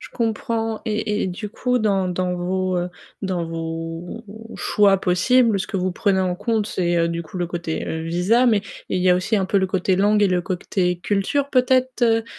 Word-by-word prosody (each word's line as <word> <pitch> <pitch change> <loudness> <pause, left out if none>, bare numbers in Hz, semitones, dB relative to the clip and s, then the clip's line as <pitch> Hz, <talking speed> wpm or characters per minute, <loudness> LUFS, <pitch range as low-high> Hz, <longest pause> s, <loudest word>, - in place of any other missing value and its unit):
Je - - -10
comprends 225 -1 -2
et 215 -1 -1
et - - 0
du 190 +3 -5
coup 250 +3 0
dans 195 -4 +1
dans 180 0 -1
vos, 185 +1 -1
heu, 175 0 -2 0.3
dans 185 -3 -1
vos 165 +4 -5 0.3
choix 200 -2 +3
possibles, 215 +5 +3
ce - - -3
que 200 - -4
vous 185 0 -1
prenez 190 0 +1
en 185 -1 0
compte 220 +1 -1
c'est, 175 -4 0
heu, 170 0 +2
du 170 0 -3
coup 170 +3 -8
le 175 - -1
côté 165 -1 -4
visa 180 +9 +2
mais 215 -4 +4 0.3
il - - 0
y 185 - +3
a 180 - +6
aussi 185 +4 0
un 190 -1 0
peu 200 - 0
le 190 - +1
côté 185 0 0
langue 210 +2 +3
et 200 - +4
le 180 -1 +1
côté 180 0 -1
culture 205 +10 0
peut-être, 255 -1 +2
heu 225 -1 +3
190 Hz, 210 wpm, -22 LUFS, 180-220 Hz, 0.3 s, a